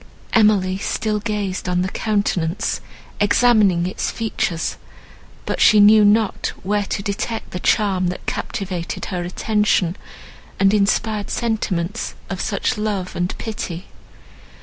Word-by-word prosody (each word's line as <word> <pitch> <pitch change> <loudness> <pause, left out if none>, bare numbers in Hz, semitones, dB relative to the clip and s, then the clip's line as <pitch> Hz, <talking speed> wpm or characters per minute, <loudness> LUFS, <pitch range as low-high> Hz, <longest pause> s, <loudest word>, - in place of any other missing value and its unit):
Emily 200 -4 +3
still 210 +1 -1
gazed 205 -4 -3
on 180 0 +1
the - - -1
countenance, 200 -3 -1 0.4
examining 205 -5 +4
its 185 - -2
features, 215 -6 -2 0.7
but - - -2
she 215 - +7
knew 210 +1 +7
not 210 0 +2
where 205 +1 0
to 200 - -3
detect 205 +3 -3
the 180 - -4
charm 190 -2 +2
that 180 - -5
captivated 180 -4 -4
her 180 -2 -3
attention, 190 -1 +1 0.6
and 195 +1 +4
inspired 210 +1 +1
sentiments 215 -4 -2 0.2
of - - -3
such - - -1
love 205 -4 -2
and 175 +1 -2
pity. 190 -5 -5
205 Hz, 125 wpm, -20 LUFS, 185-215 Hz, 0.7 s, she